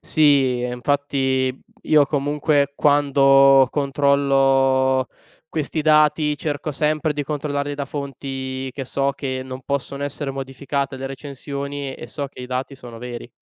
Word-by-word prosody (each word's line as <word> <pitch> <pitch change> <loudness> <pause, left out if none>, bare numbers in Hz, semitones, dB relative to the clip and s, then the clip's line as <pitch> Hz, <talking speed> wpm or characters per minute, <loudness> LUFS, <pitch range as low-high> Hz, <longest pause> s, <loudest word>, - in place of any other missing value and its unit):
Sì 135 -5 +3
e 125 - -2
infatti 130 0 0 0.2
io 150 -2 +4
comunque 145 0 +1
quando 135 -2 +5
controllo 135 -2 +2 0.4
questi 155 0 -2
dati, 150 -1 +3
cerco 150 +1 -3
sempre 150 +1 0
di 145 - -3
controllarli 145 0 -3
da 140 - -2
fonti 135 -1 -5
che 135 +1 -5
so 140 +2 -1
che 130 -1 -4
non 130 0 -8
possono 140 0 -3
essere 145 0 -4
modificate 135 +1 -3
le 135 +1 -5
recensioni, 140 0 -6
e 120 - -9
so 140 +4 -4
che 135 - -13
i 125 - -6
dati 130 +2 -3
sono 120 -3 -11
veri. 120 0 -7
140 Hz, 140 wpm, -21 LUFS, 130-145 Hz, 0.4 s, quando